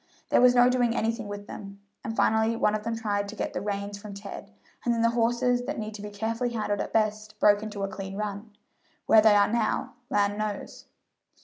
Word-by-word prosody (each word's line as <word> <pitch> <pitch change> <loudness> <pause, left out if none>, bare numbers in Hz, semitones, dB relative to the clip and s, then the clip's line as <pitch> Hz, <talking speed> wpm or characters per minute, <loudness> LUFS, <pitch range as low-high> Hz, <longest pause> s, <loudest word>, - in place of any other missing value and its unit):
"There - - +4
was 250 0 +6
no 245 0 +7
doing 245 -2 +2
anything 230 -1 -1
with 205 0 -6
them, 200 -1 -9 0.2
and 225 - -5
finally 220 +1 +3
one 210 -2 +2
of 215 - -1
them 230 +1 -3
tried 205 -3 -1
to 210 - -8
get - - -3
the - - -3
reins 200 0 -4
from 205 -1 -9
Ted, 200 0 -8 0.3
and 240 - +1
then 230 - 0
the 230 - +4
horses, 240 +1 +1
that - - -3
need 215 0 -4
to 210 - -8
be 210 - -6
carefully 225 +4 -2
handled 210 -3 -2
at - - -5
best, 215 -1 -1
broke 205 0 +5
into 210 -2 -5
a - - 0
clean 195 0 -7
run. 210 +1 -4 0.6
Where 220 -1 +7
they 215 -1 +6
are 205 0 +5
now, 235 +3 0 0.2
land 205 -4 +1
knows!" 210 -2 -5
215 Hz, 220 wpm, -27 LUFS, 205-230 Hz, 0.6 s, no